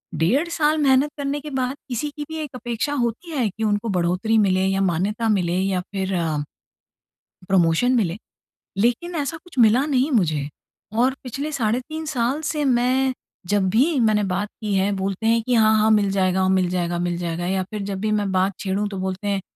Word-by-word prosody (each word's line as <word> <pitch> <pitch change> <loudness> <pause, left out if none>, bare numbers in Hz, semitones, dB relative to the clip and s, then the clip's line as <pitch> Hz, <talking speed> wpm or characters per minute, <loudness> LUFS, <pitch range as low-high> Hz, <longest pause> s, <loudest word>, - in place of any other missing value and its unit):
डेढ़ 230 - +2
साल 310 -2 +1
मेहनत 280 -1 +3
करने 285 0 -2
के 300 - -7
बाद 260 -1 -2
किसी 260 +4 -2
की 295 +1 -7
भी 320 - -5
एक 285 -3 -8
अपेक्षा 240 +3 -3
होती 270 +6 -2
है 250 -8 0
कि 220 +4 -6
उनको 210 +1 0
बढ़ोतरी 185 +4 +1
मिले 190 -2 +3
या 195 0 +1
मान्यता 195 +6 0
मिले 180 -5 +1
या 190 -1 0
फ़िर 190 0 -4
अ 160 -4 -1 1.1
प्रमोशन 180 +6 +3
मिले। 175 -4 -1 0.7
लेकिन 295 +10 0
ऐसा 280 +3 -4
कुछ 355 -6 -17
मिला 245 +6 +3
नहीं 265 +4 +2
मुझे, 155 -4 -1 0.5
और 250 +4 +2
पिछले 275 +4 -4
साढ़े 235 -4 0
3 315 0 -5
साल 250 +6 0
से 300 -2 -1
मैं 255 +1 +2 0.4
जब 200 -2 +2
भी 220 +7 +4 0.2
मैंने 210 -1 +2
बात 205 +3 -1
की 210 -2 -2
है, 195 +1 +2
बोलते 195 +3 -3
हैं 230 0 +3
कि, 250 - -1
"हाँ, 220 -2 +5
हाँ 215 +1 +3
मिल 200 -1 +1
जाएगा, 190 -1 +1
मिल 185 -1 +1
जाएगा, 175 -1 -1
मिल 175 -1 -2
जाएगा।" 170 +1 -3
या 190 0 0
फ़िर 205 +2 -6
जब 195 - -4
भी 215 - +1
मैं 200 -2 -2
बात 190 +1 +1
छेड़ूँ 200 +1 -1
तो 195 - -6
बोलते 190 +2 -3
हैं 195 - -1
215 Hz, 200 wpm, -22 LUFS, 190-260 Hz, 1.1 s, हाँ